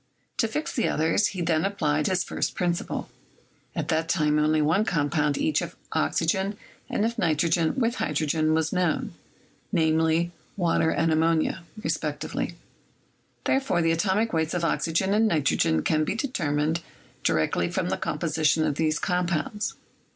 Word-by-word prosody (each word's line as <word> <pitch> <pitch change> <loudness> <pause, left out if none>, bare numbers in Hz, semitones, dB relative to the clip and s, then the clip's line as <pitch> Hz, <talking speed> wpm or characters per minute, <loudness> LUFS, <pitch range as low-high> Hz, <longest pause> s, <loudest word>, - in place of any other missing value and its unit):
To 225 - +2
fix 300 +8 -3
the 235 - +1
others, 160 +6 +2
he 185 -3 -4
then 160 -1 +1
applied 155 -7 0
his 185 -2 +1
first - - -2
principle. 175 -1 -2 0.7
At - - -3
that 160 +1 0
time 150 -3 +2
only 155 +1 +3
one 160 +7 +3
compound 150 -5 +1
each - - +1
of - - -6 0.2
oxygen 190 - 0 0.3
and 210 - 0
of 230 +1 -2
nitrogen 165 -1 +2
with 240 -1 0
hydrogen 155 +1 +1
was 160 -1 0
known, 180 -3 0 0.6
viz., 160 -1 +2 0.3
water 165 -3 +2
and 165 +2 +1
ammonia, 160 +1 +1 0.2
respectively; - - -2 0.9
therefore, 265 -11 +1
the 165 - +3
atomic 195 +6 +1
weights 160 +1 0
of 170 -1 0
oxygen 170 +4 +1
and 220 +1 +4
nitrogen 135 - +2
can 155 0 +2
be 170 - -1
determined 160 - -1 0.4
directly 80 -1 +1
from - - -1
the - - +1
composition 155 0 +1
of 145 - -1
these 155 0 +1
compounds. 180 +2 -1
165 Hz, 145 wpm, -26 LUFS, 155-190 Hz, 0.9 s, and